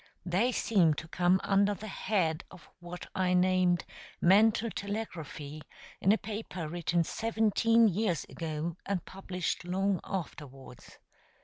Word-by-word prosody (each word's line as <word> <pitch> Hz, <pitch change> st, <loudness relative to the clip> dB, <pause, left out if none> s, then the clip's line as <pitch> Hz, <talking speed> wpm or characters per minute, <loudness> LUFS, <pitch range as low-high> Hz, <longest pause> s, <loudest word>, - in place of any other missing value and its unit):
They 190 Hz, +8 st, +2 dB
seem 180 Hz, -10 st, +3 dB
to 160 Hz, -, -7 dB
come 180 Hz, +3 st, +2 dB
under 200 Hz, +1 st, +3 dB
the 215 Hz, -, -9 dB
head 185 Hz, -5 st, -1 dB
of 180 Hz, -5 st, -15 dB
what 175 Hz, 0 st, -8 dB
I 180 Hz, -1 st, +1 dB
named 180 Hz, -1 st, +3 dB, 0.3 s
"Mental 220 Hz, +5 st, +4 dB
Telegraphy" 160 Hz, -8 st, -5 dB, 0.4 s
in 195 Hz, -, +4 dB
a 215 Hz, -, +4 dB
paper 205 Hz, -7 st, -5 dB
written 170 Hz, +1 st, 0 dB
seventeen 225 Hz, +3 st, +2 dB
years 195 Hz, -3 st, 0 dB
ago, 160 Hz, +1 st, -4 dB
and 195 Hz, -4 st, -2 dB
published 185 Hz, -2 st, -4 dB
long 190 Hz, +1 st, 0 dB
afterwards. 135 Hz, -9 st, -7 dB
185 Hz, 125 wpm, -30 LUFS, 170-205 Hz, 0.4 s, Mental